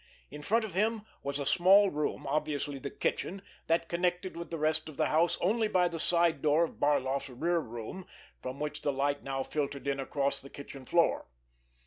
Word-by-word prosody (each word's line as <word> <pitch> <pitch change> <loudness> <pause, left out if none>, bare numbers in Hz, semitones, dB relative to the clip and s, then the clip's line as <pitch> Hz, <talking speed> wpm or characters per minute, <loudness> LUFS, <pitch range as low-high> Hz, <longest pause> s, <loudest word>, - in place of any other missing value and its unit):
In 150 +1 -8
front 220 +8 +2
of 210 - -8
him 215 +3 +1 0.2
was 140 0 -3
a 140 - -2
small 190 +6 +6
room, 150 0 -2
obviously 145 0 -1
the 140 - -5
kitchen, 195 +6 -2 0.2
that 165 0 +2
connected 180 +1 -1
with 170 0 -6
the 165 - -3
rest 155 +1 0
of 150 - -11
the - - +2
house 165 +3 +3
only 220 +4 +2
by 180 -4 +3
the 170 -1 -5
side 170 -3 +2
door 155 +2 +4
of 165 - -4
Barloff's 140 -1 +1
rear 165 +7 0
room 120 +8 -7 0.3
from 130 +2 -6
which 150 0 -3
the 145 - +1
light 140 +1 0
now 135 -1 -2
filtered 140 -1 -3
in 140 0 0
across 140 0 -1
the 135 - -11
kitchen 140 -2 -10
floor. 170 -1 +2
155 Hz, 195 wpm, -31 LUFS, 140-175 Hz, 0.3 s, small